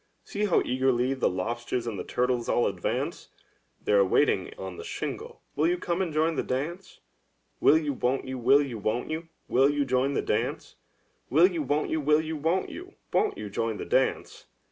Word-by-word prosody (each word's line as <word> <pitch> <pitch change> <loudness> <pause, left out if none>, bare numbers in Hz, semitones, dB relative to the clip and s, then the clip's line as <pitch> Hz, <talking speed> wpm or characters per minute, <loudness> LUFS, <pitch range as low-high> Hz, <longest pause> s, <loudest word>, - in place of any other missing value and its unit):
See 210 +1 -2
how 195 - +3
eagerly 130 0 +1
the 130 - +1
lobsters 120 +6 -3
and 110 -5 -4
the - - -3
turtles 125 -1 -1
all 120 - +3
advance! - - -2 0.5
They - - -2
are 100 -1 +6
waiting 95 - +2
on 95 -2 -7
the - - -7
shingle - - -6
— - - -41
will 150 +3 +2
you 175 +1 +1
come 175 +1 -2
and 180 -4 -1
join 160 +2 +2
the - - 0
dance? 160 +9 -4 0.6
Will 155 - +6
you, 150 -3 -1
won't 130 +1 -1
you; 130 -1 -5
will 135 +4 +5
you, 125 -6 -5
won't 110 +7 -2
you; 160 +1 -4 0.2
will 135 +3 +4
you 145 -1 +1
join 130 +2 +1
the - - 0
dance? - - -2 0.6
Will 155 +7 +6
you, 175 -4 +1
won't 145 +2 0
you; 160 - 0
will 150 +1 +4
you, 160 0 -3
won't 165 +5 0
you; 365 +2 -10 0.2
won't 425 - +2
you 105 - -5
join 115 +1 -1
the - - -5
dance? - - 0
135 Hz, 205 wpm, -27 LUFS, 120-160 Hz, 0.6 s, are